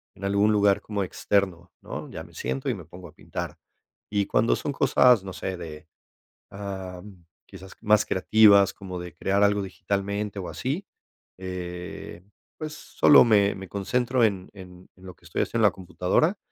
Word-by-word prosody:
en 100 - -7
algún 100 +2 +3
lugar 100 -1 +3
como 105 -2 -3
externo, 95 -2 -1
¿no?, - - -7
ya - - -7
me - - -16
siento 65 +1 -4
y - - +1
me - - -8
pongo 90 0 -12
a 75 - -16
pintar, - - -6 0.5
y 100 -1 0
cuando 115 - +2
son 145 - -3
cosas, 125 -6 +4
no 95 - -7
sé, 95 +1 -4
de, 80 -2 -9 0.6
am, 95 -2 -8 0.2
quizás 95 -1 -12
más 105 0 +4
creativas, 100 0 +5
como 90 -2 -7
de 90 -2 -8
crear 100 +4 +1
algo 100 0 +3
digitalmente 100 +2 -3
o 90 - -5
así, 150 +10 -3 0.5
eh, 90 -1 -7 0.3
pues, 155 -1 -6
solo 150 - +5
me 100 -4 +3
me 95 -1 -8
concentro 125 +5 0
en 95 -4 0
en 90 -2 -13
lo 90 -1 -12
que 85 - -32
estoy 85 - -1
haciendo 115 - -3
en - - +5
la - - -10
computadora 95 - 0
100 Hz, 170 wpm, -25 LUFS, 90-105 Hz, 0.6 s, creativas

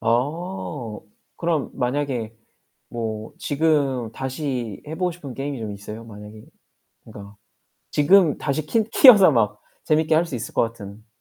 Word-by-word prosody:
아. 130 - -2 0.4
그럼 165 -4 -1
만약에 125 -3 -2 0.6
뭐 110 -2 -5
지금 140 -6 0
다시 130 -4 -4
해보고 180 +3 -2
싶은 145 -7 -9
게임이 135 -1 -4
좀 110 -2 -5
있어요? 105 +3 -8
만약에 105 0 -11 0.6
그니까 100 0 -12 0.5
지금 165 +1 +4
다시 150 +2 -2
키 225 +7 +2
키워서 210 - +8
막 105 -4 +1 0.2
재밌게 155 0 +2
할 165 +2 +4
수 150 - -7
있을 115 - -5
것 - - +3
같은. 110 -1 -6
130 Hz, 255 characters per minute, -23 LUFS, 110-155 Hz, 0.6 s, 키워서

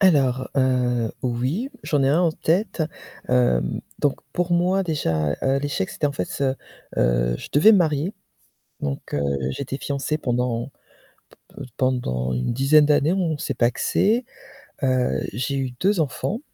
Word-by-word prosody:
Alors, 135 -9 +3
heu, 125 -3 +1
oui, 130 - -1
j'en 145 -3 +1
ai 135 - +3
un 150 +5 +3
en 165 -2 +2
tête. 175 +1 0 0.5
Hem, 125 - +2 0.2
donc 145 -2 +2 0.2
pour 175 0 0
moi 180 +3 +2
déjà, 80 - 0
heu, 135 +1 +2
l'échec, 140 -9 -2
c'était 150 - -1
en 140 - -4
fait, - - -2
ce 135 -1 -1 0.4
heu, - - +2
je - - -8
devais 190 +10 +7
me 205 - +6
marier, 155 +1 +1 0.7
donc, 70 -1 -4
heu, 70 - 0 0.3
j'étais 135 - -4
fiancée 140 +2 -2
pendant 125 -2 -1 0.8
p-p 145 - -10
pendant 65 - 0
une 60 - -1
dizaine 140 +4 +5
d'années, 150 +2 +3
on 175 -5 0
s'est - - -3
pacsé. 205 - +1 0.6
Heu, 130 - +1
j'ai 125 +6 -2
eu 135 -1 -1
2 195 -1 +2
enfants. 175 - -2
135 Hz, 150 wpm, -23 LUFS, 125-160 Hz, 0.8 s, devais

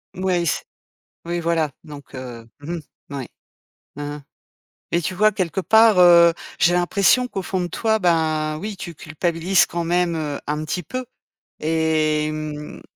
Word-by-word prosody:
Ouais, 180 -2 0
s 160 - 0 0.6
Oui, 175 +1 -2
voilà. 165 -3 0
Donc, 145 -2 -12
heu 120 -3 -8
mmh 150 +4 -6
mh, 170 - -4 0.3
oui. 135 -3 -4 0.7
Mmh 145 - -7
mh. 145 0 -5 0.8
Mais 170 - +2
tu 185 - -3
vois, 215 +3 +4
quelque 190 -2 -2
part, 220 0 +5
heu, 170 -1 +8 0.3
j'ai 175 +3 +4
l'impression 200 +7 +3
qu'au 195 -5 -4
fond 185 0 -2
de 175 - -2
toi, 220 +4 0
ben, 155 -3 +1
oui, 205 +3 -5
tu 175 -2 -7
culpabilises 165 +4 +1
quand 170 0 -3
même, 175 0 +1
heu, 150 -2 -3
un 150 +1 -1
petit 180 +4 -3
peu. 255 - -5 0.5
Et, 155 -1 +1
mmh, 155 -1 -6
170 Hz, 160 wpm, -22 LUFS, 155-180 Hz, 0.8 s, heu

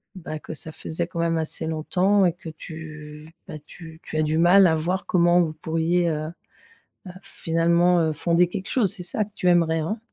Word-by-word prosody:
bah 155 -4 -7
que 160 - -8
ça 160 +1 -6
faisait 160 +2 -4
quand 170 - -7
même 165 0 +1
assez 160 0 -2
longtemps 185 +5 +1
et 175 - +2
que 175 -2 -10
tu 155 -1 -10 0.2
bah, - - -8
tu 160 -2 -12
tu 155 - -6
as 155 - +2
du 155 +1 0
mal 185 +3 +6
à 160 - +2
voir 175 +5 -2
comment 175 0 +3
vous 160 -2 -1
pourriez, 165 +2 0
heu, 155 0 -3 0.8
heu, 180 - -7
finalement, 170 0 +1
heu, 160 -1 0
fonder 170 +3 +2
quelque 190 +2 -6
chose? 225 -8 +1
C'est 180 -4 -5
ça 210 +4 -2
que 210 - -20
tu 180 - +1
aimerais 165 -2 +3
hein? 190 +8 -3
165 Hz, 205 wpm, -24 LUFS, 160-180 Hz, 0.8 s, mal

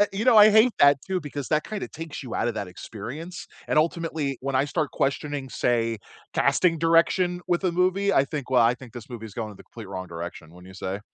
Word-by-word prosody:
I 205 - +5
you 205 +4 -2
know, 250 -3 +6
I 210 0 +9
hate 220 +3 +5
that 140 -1 +6
too, 190 -1 -1
because 145 -2 -6
that 155 0 +1
kind 215 -2 -5
of - - -5
takes 160 -2 -7
you 125 -4 -7
out - - 0
of 115 - -2
that 100 -3 -4
experience, 140 - -8 0.2
and, - - +2
ultimately, 160 -3 0
when 135 0 -3
I 135 +2 +3
start 150 +1 -2
questioning, 140 -1 -2
say, 115 -2 0 0.4
casting 165 -3 +2
direction 175 +2 +3
with 175 +2 +1
a 180 - +2
movie, 185 +3 +2
I 140 - +4
think, 140 -3 -6
"Well, 125 -2 +5
I 115 +2 +4
think 125 -3 -13
this 120 -3 -10
movie 115 -2 -7
is 105 - -12
going 110 -2 -4
in 105 - -12
the - - -14
complete 110 -5 -11
wrong 95 -1 -5
direction," 85 -1 -8
wouldn't 90 +1 -14
you 95 - -12
say? 95 +1 -4
140 Hz, 250 wpm, -25 LUFS, 115-170 Hz, 0.4 s, I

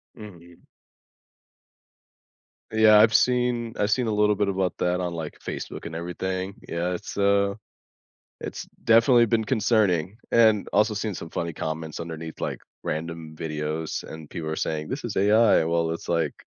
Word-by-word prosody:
Mhm. 85 -6 -13 2.1
Yeah, 110 -1 +7
I've 110 0 +6
seen 125 -2 +2
I 105 - +2
seen 120 +2 +1
a 110 - 0
little 105 0 +3
bit 105 0 0
about 95 -2 -1
that 90 +1 0
on, 90 -1 -2
like, 80 -3 -6
Facebook - - -6
and 80 - -6
everything, 95 +3 -4
yeah, 85 +2 -2
it's, 90 - -7
uh 100 0 +2 0.8
it's - - -6 0.2
definitely 115 +1 +6
been 110 0 +1
concerning, 105 - +1
and 110 -3 +4
also 105 +1 +3
seen 105 0 -2
some 80 - -7
funny 85 -1 -3
comments 80 0 -5
underneath, 80 -1 -7
like, - - -3 0.2
random 80 0 -5
videos 75 0 -3
and 80 -1 -10
people 80 -3 -4
are 80 - -2
saying, 75 -1 -3
"This - - -4
is - - -4
AI," 105 -1 +4
well, 85 0 +1
it's 85 - -6
like 85 -1 +1
95 Hz, 155 wpm, -25 LUFS, 80-110 Hz, 2.1 s, Yeah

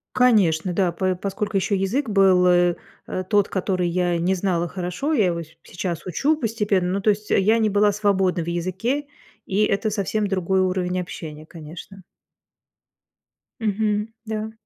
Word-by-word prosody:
Конечно, 190 -9 +3
да, 180 -1 +1
п 185 +2 -1
поскольку 200 +2 -2
еще 200 +2 0
язык 220 +8 -1
был, 190 -3 +4
э, 175 -1 +4 0.3
э, 185 - -3
тот, 205 -2 +3
который 185 -2 -1
я 175 0 0
не 175 +3 +1
знала 175 -2 0
хорошо, 180 - -3
я 220 -9 +3
его 170 -1 -1
и - - -6 0.2
сейчас 170 -1 -5
учу 275 - +1
постепенно. 210 - 0
Ну, 200 - -1
то 210 - +4
есть, 210 +1 -5
я 215 +4 +3
не 220 -1 +2
была 205 +1 +3
свободной 195 -4 +1
в - - -10
языке. 190 - -2 0.4
И 200 +2 +1
это 200 +2 0
совсем 210 0 -1
другой 190 -1 +1
уровень 185 -1 0
общения, 155 -3 -8
конечно. 165 +4 -11 1.6
Мгм, 210 0 0 0.2
да. 220 0 -4
190 Hz, 160 wpm, -23 LUFS, 180-210 Hz, 1.6 s, был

